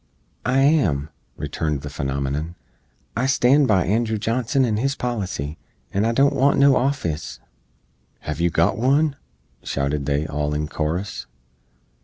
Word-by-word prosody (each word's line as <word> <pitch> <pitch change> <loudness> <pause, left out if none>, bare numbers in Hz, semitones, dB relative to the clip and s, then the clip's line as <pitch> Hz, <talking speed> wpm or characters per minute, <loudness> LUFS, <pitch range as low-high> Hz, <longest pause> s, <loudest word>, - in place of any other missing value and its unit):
"I 130 +2 +3
am," 90 - +2 0.3
returned 75 -3 -2
the 75 - -5
phenomenon. 70 +5 -3 0.6
"I 125 +3 +1
stand 140 +1 +4
by 95 -5 +3
Andrew 110 +4 +1
Johnson 125 +5 +1
and 110 -3 0
his 135 +3 0
policy, 95 - -3 0.3
and 100 +3 +1
I - - +2
don't 140 +4 +3
want 140 +1 +3
no 140 -1 +6
office!" 125 - -1 0.8
"Hev 75 +1 -4
yoo 85 - +3
got 85 +5 +1
wun?" 140 +4 +2 0.5
shouted 70 +1 -2
they 75 +1 +1
all 75 -1 -2
in 75 0 -2
korus. 80 +6 -3
100 Hz, 140 wpm, -22 LUFS, -, 0.8 s, no